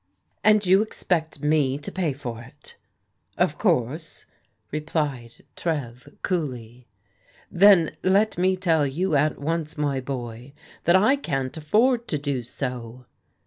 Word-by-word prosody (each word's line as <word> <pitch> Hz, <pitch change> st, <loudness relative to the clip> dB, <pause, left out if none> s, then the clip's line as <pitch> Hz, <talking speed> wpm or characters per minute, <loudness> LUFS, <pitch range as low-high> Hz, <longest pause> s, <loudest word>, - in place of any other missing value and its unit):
" -, -, -46 dB
And 215 Hz, -1 st, +4 dB
you 190 Hz, +2 st, +5 dB
expect 160 Hz, -8 st, -2 dB
me 150 Hz, -3 st, +2 dB
to 145 Hz, -, -7 dB
pay 180 Hz, -5 st, -1 dB
for 125 Hz, -4 st, -6 dB
it? 120 Hz, +2 st, -14 dB, 0.3 s
" -, -, -45 dB
"Of -, -, +1 dB
course," 150 Hz, +7 st, -1 dB, 0.5 s
replied 150 Hz, -6 st, -3 dB
Trev 135 Hz, -4 st, -4 dB
coolly. 125 Hz, -, -3 dB, 0.6 s
"Then 185 Hz, -3 st, +5 dB
let 200 Hz, +3 st, +2 dB
me 185 Hz, +1 st, +1 dB
tell 165 Hz, -5 st, +2 dB
you 160 Hz, +4 st, -1 dB
at 150 Hz, +2 st, +2 dB
once, 160 Hz, +1 st, -3 dB
my 145 Hz, -2 st, 0 dB
boy, 125 Hz, -1 st, -6 dB, 0.3 s
that 170 Hz, -, +5 dB
I 215 Hz, +9 st, +4 dB
can't 135 Hz, -, -3 dB
afford 230 Hz, -, +2 dB
to 150 Hz, -, -1 dB
do 140 Hz, -3 st, -2 dB
so." 125 Hz, 0 st, -6 dB
150 Hz, 140 wpm, -24 LUFS, 130-180 Hz, 0.6 s, you